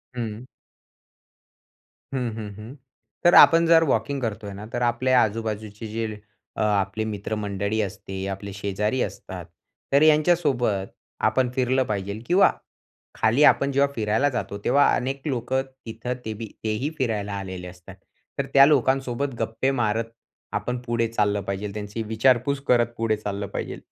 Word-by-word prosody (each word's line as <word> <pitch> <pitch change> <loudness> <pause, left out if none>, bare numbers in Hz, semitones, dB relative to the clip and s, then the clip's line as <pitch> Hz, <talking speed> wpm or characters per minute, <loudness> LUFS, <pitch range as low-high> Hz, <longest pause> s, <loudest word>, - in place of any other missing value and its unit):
हं. 115 -1 -5 1.7
हं, 125 -3 -1
हं, 110 -2 -6
हं. 110 +6 -10 0.5
तर 175 - +7
आपण 165 0 +8
जर 165 0 +6
वॉकिंग 140 -2 0
करतोय 110 -3 -4
ना. 100 +2 -8
तर 120 - -2
आपल्या 125 +2 +3
आजूबाजूचे 110 0 -4
जे 110 0 -4 0.4
अ, - - -1
आपले 105 0 +1
मित्रमंडळी 105 0 -3
असते, 95 -1 -5
आपले 100 +1 -5
शेजारी 105 +5 -1
असतात. - - -5 0.5
तर 140 - +5
यांच्यासोबत 150 - +3 0.4
आपण 130 -1 +1
फिरलं 130 +1 +1
पाहिजे 100 -3 -3
किंवा 185 +3 +5 0.6
खाली 115 +7 +3
आपण 140 -1 +5
जेव्हा 140 +1 +2
फिरायला 110 +4 +1
जातो, 120 -6 -4
तेव्हा 145 0 +4
अनेक 135 +2 -3
लोकं 130 0 0 0.2
तिथं 115 +2 -4
तेबी 110 +1 -5 0.2
तेही 110 +6 -1
फिरायला 105 -7 -1
आलेले 95 -2 -6
असतात. 90 +1 -12 0.4
तर - - +1
त्या 135 0 +9
लोकांसोबत 135 -1 +1
गप्पे 115 +4 0
मारत 115 0 0 0.5
आपण 125 0 -3
पुढे 115 -1 0
चाललं 105 -2 0
पाहिजे. 100 +1 -4
त्यांची 105 +2 -5
विचारपूस 125 +5 +2
करत 120 -1 +3
पुढे 115 -1 +1
चाललं 100 -1 -4
पाहिजे. - - -5
115 Hz, 140 wpm, -24 LUFS, 105-130 Hz, 1.7 s, त्या